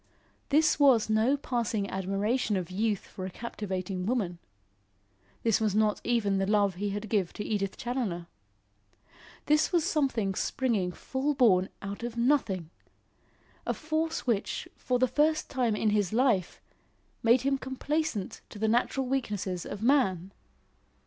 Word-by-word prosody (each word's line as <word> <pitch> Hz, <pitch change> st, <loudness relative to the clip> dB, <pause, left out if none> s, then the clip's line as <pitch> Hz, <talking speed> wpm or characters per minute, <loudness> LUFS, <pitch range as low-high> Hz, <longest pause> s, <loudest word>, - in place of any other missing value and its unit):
This 305 Hz, +1 st, +3 dB
was 250 Hz, -7 st, +5 dB
no 225 Hz, +6 st, +3 dB
passing 230 Hz, -6 st, -1 dB
admiration 195 Hz, +4 st, 0 dB
of 180 Hz, -1 st, -4 dB
youth 210 Hz, +1 st, -1 dB
for 185 Hz, -, -8 dB
a 185 Hz, -, -3 dB
captivating 190 Hz, -3 st, -4 dB
woman. 200 Hz, -8 st, -1 dB, 1.0 s
This 225 Hz, -2 st, +2 dB
was 210 Hz, -2 st, +1 dB
not 215 Hz, -1 st, +2 dB
even 205 Hz, -5 st, +1 dB
the 195 Hz, -, 0 dB
love 205 Hz, -2 st, +3 dB
he 200 Hz, +3 st, -3 dB
had 205 Hz, +2 st, -4 dB
given 195 Hz, -5 st, 0 dB
to 210 Hz, -, -5 dB
Edith 200 Hz, -3 st, -2 dB
Challoner. 235 Hz, -9 st, -3 dB, 1.2 s
This 300 Hz, +1 st, +3 dB
was 345 Hz, -3 st, +3 dB
something 270 Hz, -, 0 dB
springing 210 Hz, -4 st, 0 dB
full 270 Hz, +9 st, -2 dB
born 195 Hz, -8 st, +4 dB
out 200 Hz, +2 st, -5 dB
of 240 Hz, 0 st, -5 dB
nothing! 230 Hz, -, +1 dB, 0.9 s
a -, -, -1 dB
force 315 Hz, +1 st, -2 dB
which, 225 Hz, -5 st, -1 dB
for 250 Hz, -, 0 dB
the 255 Hz, +1 st, +3 dB
first 310 Hz, +4 st, +1 dB
time 245 Hz, -5 st, +1 dB
in 215 Hz, 0 st, +1 dB
his 205 Hz, -4 st, +1 dB
life, 225 Hz, -6 st, +1 dB, 0.6 s
made 235 Hz, +2 st, +5 dB
him 275 Hz, 0 st, +1 dB
complaisant 265 Hz, -4 st, -2 dB
to -, -, -10 dB
the 220 Hz, +2 st, 0 dB
natural 245 Hz, +4 st, +1 dB
weaknesses 205 Hz, -9 st, -2 dB
of 205 Hz, +1 st, -6 dB
man! 195 Hz, -, +2 dB
220 Hz, 145 wpm, -29 LUFS, 195-260 Hz, 1.2 s, was